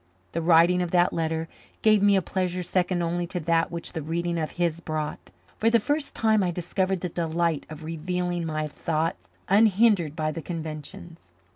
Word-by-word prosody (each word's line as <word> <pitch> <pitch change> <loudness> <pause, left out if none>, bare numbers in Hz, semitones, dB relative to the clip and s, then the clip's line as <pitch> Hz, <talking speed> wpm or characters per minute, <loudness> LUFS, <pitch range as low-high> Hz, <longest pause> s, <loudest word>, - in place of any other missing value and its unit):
The 170 - -2
writing 170 +2 +5
of 175 - -1
that 175 0 +3
letter 160 0 -1 0.4
gave 215 -2 +5
me 205 0 +5
a 190 - +2
pleasure 180 0 -2
second 180 0 0
only 175 +1 -1
to 180 - -4
that 165 +1 +2
which 170 0 -6
the 160 - -3
reading 170 +2 -2
of 155 - -2
his 170 -2 0
brought. 155 -2 -4 0.3
For 225 - +4
the 230 0 +4
first 290 +6 -2
time 220 -2 +3
I 185 - +1
discovered 180 +2 -1
the 180 - -2
delight 165 -1 -1
of 155 0 -9
revealing 175 +2 -2
my 155 -1 -2
thought 160 +3 -1 0.3
unhindered 200 -5 +4
by 155 -1 -1
the 160 - -5
conventions. 160 - -7
170 Hz, 180 wpm, -26 LUFS, 160-185 Hz, 0.4 s, writing